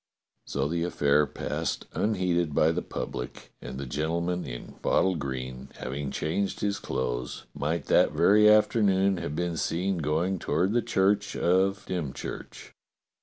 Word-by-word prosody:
So 70 0 -1
the 85 +2 -1
affair 75 -3 +2
passed - - -3
unheeded 90 -7 0
by 80 - +4
the - - -1
public, 60 0 -6
and 65 - -7
the 70 - -4
gentleman 85 +6 -1
in - - -7
bottle 95 0 +2
green, 65 -2 -5
having 70 +2 -4
changed 95 +8 -2
his 100 -1 0
clothes, 60 0 -3
might 80 +4 -2
that - - +4
very 105 +1 +5
afternoon 100 -3 +4
have 75 -3 -4
been 85 0 -1
seen 90 +3 0
going 80 +5 0
toward 90 +8 +1
the 120 - +3
church 100 +1 +1
of 95 +3 +2
Dymchurch. 85 -8 -5
85 Hz, 140 wpm, -28 LUFS, 70-95 Hz, -, very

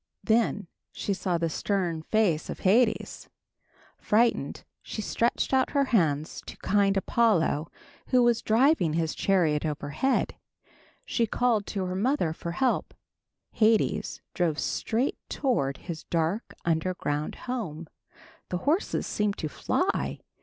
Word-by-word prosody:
Then 220 -3 +2 0.3
she 200 - -2
saw 185 -2 -1
the 165 0 0
stern 175 -1 -1
face 180 -3 +1
of - - -6
Hades. 225 +6 +2 0.7
Frightened, 220 -9 +1 0.2
she - - -7
stretched 230 +5 0
out 260 0 +2
her 280 - +5
hands 155 -7 +1
to - - -8
kind 200 0 +2
Apollo 190 -8 +2 0.4
who 250 -1 +4
was 240 -1 +3
driving 225 - +3
his 160 -1 0
chariot 165 -7 +2
overhead. 150 - -1 0.7
She 230 -2 0
called 230 -3 +1
to 195 -3 -2
her 180 - -3
mother 200 - +1
for 170 +1 -5
help. 260 +8 0 0.6
Hades 220 -1 +1
drove 165 -4 0
straight 235 - -1
toward 140 - 0
his 165 -3 -7
dark 170 +6 -1
underground 160 -3 -1
home. 180 -11 -4 0.6
The 180 - -1
horses 300 - 0
seemed 210 -1 -1
to 155 - -3
fly. - - -1
195 Hz, 125 wpm, -27 LUFS, 160-230 Hz, 0.7 s, her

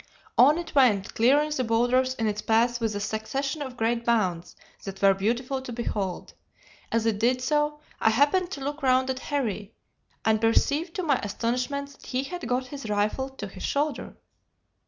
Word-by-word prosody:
On 290 +6 +6
it 345 - -6
went, 225 -8 +3
clearing 285 +6 +3
the 265 -4 0
boulders 245 +3 +2
in 225 - -2
its 210 0 -1
path 235 +2 +2
with 220 -2 -1
a - - -2
succession 265 +8 -3
of 260 -3 -6
great 230 +1 0
bounds 190 -8 0 0.3
that 195 -1 -7
were 195 -1 +5
beautiful 240 +7 -1
to 260 - -7
behold. 205 -6 -3 0.6
As 230 -1 +1
it 220 -3 +1
did 250 +3 +2
so, 295 +2 0 0.2
I - - +4
happened 290 +10 +3
to 280 - -6
look 290 +2 -4
round 260 0 +3
at 260 - -4
Harry, 225 -8 -3 0.5
and 220 -1 +3
perceived 285 +9 +1
to 370 - -2
my 285 -6 +2
astonishment 250 +7 -2
that 280 - -16
he 255 +1 -1
had 275 -2 -6
got 250 +2 0
his 265 -3 -8
rifle 210 +6 0
to 265 -6 -7
his 190 -1 -11
shoulder. 290 +1 -2
245 Hz, 180 wpm, -26 LUFS, 220-280 Hz, 0.6 s, On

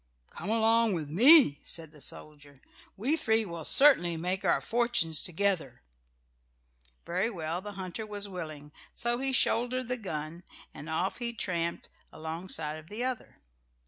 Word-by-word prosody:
"Come 175 - -7
along 225 0 +2
with 155 -5 -4
me," 240 - +8
said 160 -2 -5
the 150 -2 -14
soldier, 145 -2 -7 0.4
"we 255 +10 +2
three 225 -7 0
will 170 -3 -7
certainly 175 - +4
make 180 +4 -3
our - - +2
fortunes 235 -10 +1
together." 175 - -2 1.2
Very 185 +6 -1
well; 170 -3 -5
the 205 +1 -9
hunter 190 +3 -6
was 205 -1 -4
willing. 155 -6 -8 0.2
So 240 0 -1
he 270 0 0
shouldered 245 0 0
the 250 - -1
gun 160 -5 -6 0.3
and 150 - -10
off 180 +7 -2
he 235 -1 -2
tramped 170 -7 -4 0.2
alongside 160 -1 -5
of 155 +2 -17
the 215 +4 -5
other. 255 -2 -5
185 Hz, 145 wpm, -28 LUFS, 160-230 Hz, 1.2 s, me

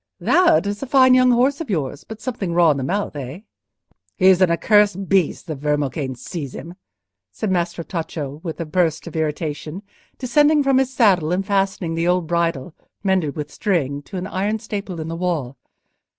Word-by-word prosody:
"That 345 - +4
is 205 0 -3
a 275 - -4
fine 260 -1 +5
young 255 0 +5
horse 260 +5 +2
of 310 - -6
yours, 145 -7 -2
but 220 -1 -10
something 215 -7 -4
raw 170 -2 +5
in 145 - -1
the 135 - -3
mouth, 195 +4 -2
eh?" 140 +5 -6 0.8
"He 185 - +1
is 190 -1 +4
an 185 - +5
accursed 195 +3 +2
beast, 190 -4 +1
the 160 - -4
vermocane 145 -2 -2
seize 135 +2 -7
him!" 170 - -8 0.6
said 205 - -3
Maestro 170 -1 -1
Tacco, 155 -4 -5
with 165 -2 -6
a 165 - -3
burst 160 -1 0
of 170 - -9
irritation, 155 +3 -3 0.3
descending 295 +4 +3
from 270 -1 +3
his 265 -1 0
saddle 190 -11 +3
and 190 +2 0
fastening 195 -4 0
the 165 +1 -1
old 180 -1 +2
bridle, 170 -2 -1 0.3
mended 185 -7 +1
with 150 -1 -5
string, 145 -8 -1
to 185 - -8
an 180 - -4
iron 200 +3 -1
staple 200 -5 -6
in 160 - -5
the 165 - -4
wall. 165 -7 -2
180 Hz, 190 wpm, -21 LUFS, 155-205 Hz, 0.8 s, fine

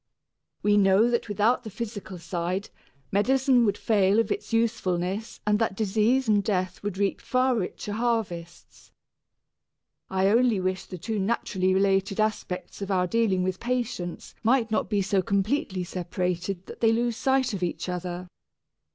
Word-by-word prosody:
We 205 0 +4
know 200 +4 +4
that 235 -1 -1
without 210 +5 +2
the 220 - -6
physical 205 -3 -6
side 175 +3 -3 0.4
medicine 255 +4 +3
would 205 - +1
fail 200 -2 +3
of 225 -2 +2
its - - -3
usefulness 215 -3 -1
and 210 0 +2
that 225 -4 0
disease 220 +5 +2
and 205 -2 +3
death 185 -3 -1
would 205 -2 -4
reap 200 -1 0
far 255 0 +2
richer 205 0 -3
harvests: 210 -7 -3 1.2
I 190 0 +2
only 230 -1 +3
wish 185 0 -2
the 185 - -8
two 220 +4 -3
naturally 190 -2 0
related 195 +1 +2
aspects 215 -3 -2
of 200 - -4
our 185 -2 +2
dealing 195 -2 +1
with 185 0 -2
patients 240 -8 -3
might 235 -1 +2
not 215 - 0
be 205 -2 +1
so 195 0 +1
completely 200 - 0
separated 180 +1 -3
that - - -10
they 225 -1 +5
lose 235 +1 +1
sight 265 0 +1
of 195 - -4
each 175 +1 -2
other. 180 0 -4
205 Hz, 155 wpm, -26 LUFS, 185-230 Hz, 1.2 s, they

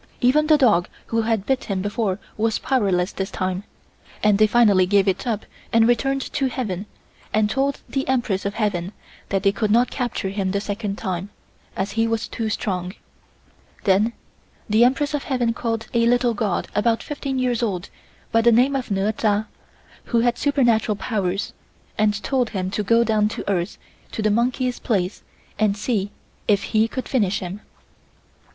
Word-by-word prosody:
Even 290 +5 +3
the 305 -1 +6
dog 215 - +3 0.2
who 230 0 0
had 220 -3 0
bit 265 -1 0
him 190 -3 -2
before 205 -2 -1 0.2
was 220 0 +1
powerless 195 -8 +1
this 190 0 -3
time, 185 +1 -3 0.6
and 210 -1 +4
they 215 - +6
finally 205 -5 +4
gave 200 0 +3
it 190 +6 0
up 220 -3 -1 0.3
and 225 0 +5
returned 270 +3 +1
to 270 - +1
heaven 210 -7 -3 0.4
and 215 0 +2
told 275 +3 0
the 270 -1 -2
Empress 240 -7 0
of 200 +1 -3
Heaven 200 -4 -1 0.4
that 195 -1 0
they 195 - +4
could 210 +1 -1
not 240 +4 +3
capture 240 -6 -2
him 195 -1 -1
the 200 +1 0
second 205 0 -3
time, 190 -1 -3 0.5
as 195 +1 -2
he 225 +1 +1
was 225 -1 -1
too 225 -1 -3
strong. 185 -4 -2 0.9
Then 205 +4 +3 0.5
the 220 +1 +4
Empress 285 +4 +2
of 290 - -2
Heaven 245 -4 0
called 225 -1 -2
a 235 -1 +3
little 245 0 +3
god 210 -4 -1
about 225 +2 +1
fifteen 280 -3 -4
years 250 -2 0
old 195 -6 -2 0.4
by 230 - +4
the 235 +1 +5
name 255 +5 +4
of 260 -3 -2
Neur 200 +1 +1
Cha, 215 0 +1 0.6
who 235 -2 +2
had 240 0 +2
supernatural 240 -7 +2
powers, 195 -3 -2 0.4
and 210 -1 +1
told 255 -4 +1
him 190 -3 -3
to 210 - -1
go 230 +3 +4
down 215 -2 +2
to - - -6
earth 185 -1 -1 0.4
to 220 - -2
the 215 - +3
monkey's 250 +3 0
place 195 -4 -1 0.4
and 210 -2 +2
see 205 -2 -1 0.4
if 205 -2 +3
he 220 +1 +4
could 255 +1 -5
finish 205 -7 +1
him. 190 +3 -6
220 Hz, 175 wpm, -22 LUFS, 200-240 Hz, 0.9 s, the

